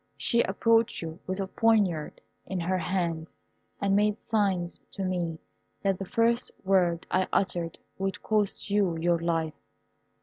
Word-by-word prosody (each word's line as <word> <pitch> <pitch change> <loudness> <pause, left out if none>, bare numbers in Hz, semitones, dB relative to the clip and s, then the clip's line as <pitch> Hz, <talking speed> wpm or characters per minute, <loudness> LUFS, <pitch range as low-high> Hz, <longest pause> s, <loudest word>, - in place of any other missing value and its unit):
She 235 -1 +3
approached 225 +1 +2
you 165 +1 -6
with 185 +1 -2
a 195 - 0
poniard 200 -7 +1 0.3
in 190 - -2
her 185 +2 0
hand, 170 -2 -1 0.5
and 195 -1 +2
made 210 +1 +3
signs 195 -7 0
to 195 - -3
me 175 -3 -1 0.5
that 195 -2 +1
the 195 - -5
first 235 +1 +2
word 180 -3 +2
I 185 0 +2
uttered 175 -3 0 0.2
would 195 +1 -2
cost 210 -1 0
you 195 -5 +2
your 170 +1 +2
life. 165 -2 0
190 Hz, 145 wpm, -28 LUFS, 170-205 Hz, 0.5 s, She